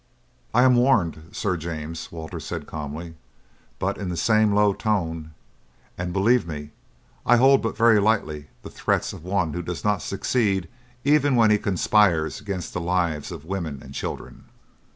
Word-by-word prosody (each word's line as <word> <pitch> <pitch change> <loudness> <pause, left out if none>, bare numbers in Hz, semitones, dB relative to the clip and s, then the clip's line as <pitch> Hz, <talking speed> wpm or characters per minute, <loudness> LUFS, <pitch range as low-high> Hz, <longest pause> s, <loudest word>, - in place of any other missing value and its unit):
"I 125 - +4
am 130 -1 +5
warned, 90 - +2
Sir 95 -3 -1
James," 80 0 -6
Walter 80 -1 -7
said - - -5
calmly, 75 +3 -6 0.6
but - - -2
in 100 -3 -3
the 85 - -3
same 110 +1 +3
low 105 0 +4
tone, 80 -8 -2 0.6
"and, 90 0 -4
believe 100 +3 +2
me, 75 -2 -6 0.5
I 120 - +5
hold 135 +2 +5
but 115 - -3
very 115 -2 +5
lightly 100 -9 0 0.2
the - - -9
threats - - -1
of - - -10
one 90 -4 0
who 90 - -3
does 90 0 -5
not 105 -3 +1
succeed 100 -3 0 0.4
even 145 -1 +3
when 115 -3 +5
he 105 - +4
conspires 95 -4 +2
against 95 -3 -5
the 90 - -2
lives 85 -3 -1
of 80 -3 -8
women 85 -6 -4
and 65 - -11
children." - - -6
90 Hz, 165 wpm, -24 LUFS, 80-110 Hz, 0.6 s, am